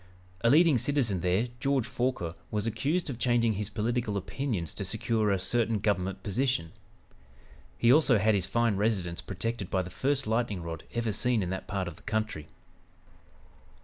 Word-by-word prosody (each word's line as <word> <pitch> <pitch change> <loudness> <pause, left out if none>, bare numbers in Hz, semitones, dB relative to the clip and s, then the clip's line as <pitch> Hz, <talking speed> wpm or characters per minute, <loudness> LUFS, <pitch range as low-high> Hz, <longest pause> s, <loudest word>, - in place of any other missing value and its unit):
A 115 - +5
leading 155 -2 +6
citizen 125 -7 +1
there, 90 +7 +1
George 135 -1 +1
Forquer, 120 -10 -2 0.2
was 105 0 -2
accused 135 - 0
of 130 -5 -5
changing 120 -2 +2
his 105 0 -4
political 115 -1 -1
opinions 100 - -3
to - - -5
secure 110 -2 0
a 100 - +2
certain 115 +3 0
government 95 -2 -1
position; 125 -4 0 1.1
he 120 +4 +5
also 145 -5 +5
had 110 +2 +3
his 95 -3 +1
fine 115 -4 +1
residence 95 -5 0
protected 100 +1 -4
by 95 -1 +1
the 90 - -8
first 135 +6 0
lightning 110 -4 -1
rod 80 -1 -6
ever 115 -2 0
seen 115 0 +1
in 90 - -3
that 95 - -4
part 95 -3 -2
of 85 - -7
the - - -17
country. 110 -9 -2
110 Hz, 170 wpm, -29 LUFS, 95-120 Hz, 1.1 s, leading